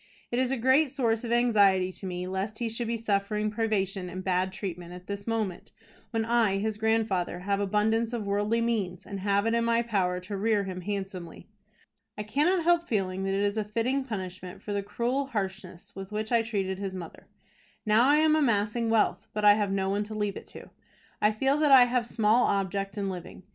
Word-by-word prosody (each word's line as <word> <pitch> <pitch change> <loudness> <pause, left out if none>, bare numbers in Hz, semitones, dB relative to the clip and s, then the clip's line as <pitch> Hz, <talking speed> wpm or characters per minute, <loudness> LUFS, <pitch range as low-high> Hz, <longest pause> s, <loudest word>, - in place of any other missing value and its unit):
It 240 - 0
is 255 -1 +1
a 270 - 0
great 260 +5 +4
source 230 -3 0
of 235 - -4
anxiety 200 -6 +3
to 190 - -8
me 180 0 -4
lest 190 +3 -3
he 235 -1 -2
should 230 +1 -3
be 230 0 -1
suffering 210 0 -1
privation 195 -4 -1
and 185 +1 -6
bad 185 0 0
treatment 180 -3 -6
at 180 0 -11
this 200 +1 -6
moment, 215 -6 -3 0.4
when 225 -1 -1
I, 230 -4 +2
his 215 +1 -2
grandfather, 215 -5 0
have 200 +1 0
abundance 215 +3 +1
of 235 -4 -3
worldly 205 +3 0
means, 205 -7 -2
and 200 -1 -6
have 200 +1 +1
it 225 - +1
in 235 0 +2
my 230 0 +2
power 190 -6 0
to 200 +3 -6
rear 210 +1 +1
him 185 -1 -5
handsomely. 190 -3 -5 0.7
I 210 - -3
cannot 310 - +1
help 345 0 +3
feeling 190 -3 -1
that 195 0 0
it 200 - +1
is 205 +1 0
a 215 - +1
fitting 230 +6 -1
punishment 185 -6 -7
for 205 - -4
the 200 - 0
cruel 240 +7 -2
harshness 195 -4 -5
with 195 +1 -8
which 215 +2 -3
I 235 -1 +4
treated 195 -4 -2
his 195 -1 -4
mother. 175 -3 -9 0.6
Now 215 +3 +4
I 290 - +6
am 310 0 +4
amassing 230 -4 +1
wealth 215 -3 +1
but 210 0 0
I 205 - +9
have 205 -1 0
no 195 -1 0
one 200 +1 0
to 215 +1 -7
leave 205 -2 -1
it - - -9
to. - - -12 0.5
I 210 - +4
feel 270 +6 +1
that 300 -1 +3
I 260 -2 +9
have 245 -1 0
small 225 +1 +3
object 195 0 -1
in 200 -1 -1
living. 185 -1 -7
210 Hz, 210 wpm, -28 LUFS, 195-230 Hz, 0.7 s, I